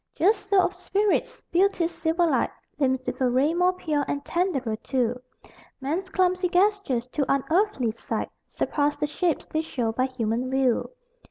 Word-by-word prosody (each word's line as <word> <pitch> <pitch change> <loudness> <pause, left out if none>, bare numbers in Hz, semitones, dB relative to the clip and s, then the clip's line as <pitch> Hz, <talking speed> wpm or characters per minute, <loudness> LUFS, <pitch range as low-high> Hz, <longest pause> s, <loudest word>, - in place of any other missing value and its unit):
Just 400 +2 +2
so 400 -1 +5
of 360 0 +2
spirits. 395 +3 0
Beauty's 350 -1 +2
silver 325 +2 +1
light 325 - +2 0.3
Limns 260 -2 +1
with - - -4
a 255 - +3
ray 265 +6 +2
more 360 +1 +3
pure, 310 -5 -1
and 285 0 -3
tenderer 285 - 0
too: 245 0 -1 0.6
Men's 325 +8 -2
clumsy 365 -1 +1
gestures, 365 - +2
to 280 +1 -1
unearthly 275 - +1
sight, 225 - -4 0.2
Surpass 290 0 0
the - - 0
shapes 325 +2 -1
they 315 - -1
show 245 -8 -2
by 255 +3 0
human 245 -1 -2
view. 265 -3 +1
310 Hz, 160 wpm, -25 LUFS, 260-365 Hz, 0.6 s, so